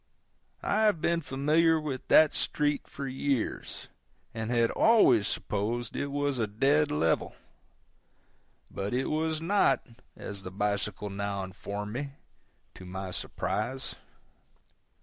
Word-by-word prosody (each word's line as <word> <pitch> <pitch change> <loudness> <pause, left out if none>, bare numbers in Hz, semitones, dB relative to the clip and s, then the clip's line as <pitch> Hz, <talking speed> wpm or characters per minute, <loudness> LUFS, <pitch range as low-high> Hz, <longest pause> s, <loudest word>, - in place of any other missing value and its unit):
I 215 +1 +2
have 205 -6 +3
been 170 +1 +1
familiar 155 +4 +2
with 145 -4 -5
that 155 -1 +6
street 145 -1 0
for 140 -1 -6
years, 135 -2 -2 0.5
and 110 0 -4
had 115 -1 +2
always 130 - +5
supposed 110 +3 -2
it 140 - -1
was 140 -2 -1
a 110 - +1
dead 140 +8 +2
level; 80 +2 0 1.4
but 100 +4 -3
it 130 +1 0
was 160 0 0
not, 200 +4 +3 0.3
as 100 -1 -6
the 90 - -7
bicycle 100 +1 -2
now 100 0 -3
informed 100 +2 -6
me, 140 +2 -4 0.6
to - - -12
my 95 +1 -6
surprise. 110 +9 -3
125 Hz, 125 wpm, -29 LUFS, 100-150 Hz, 1.4 s, that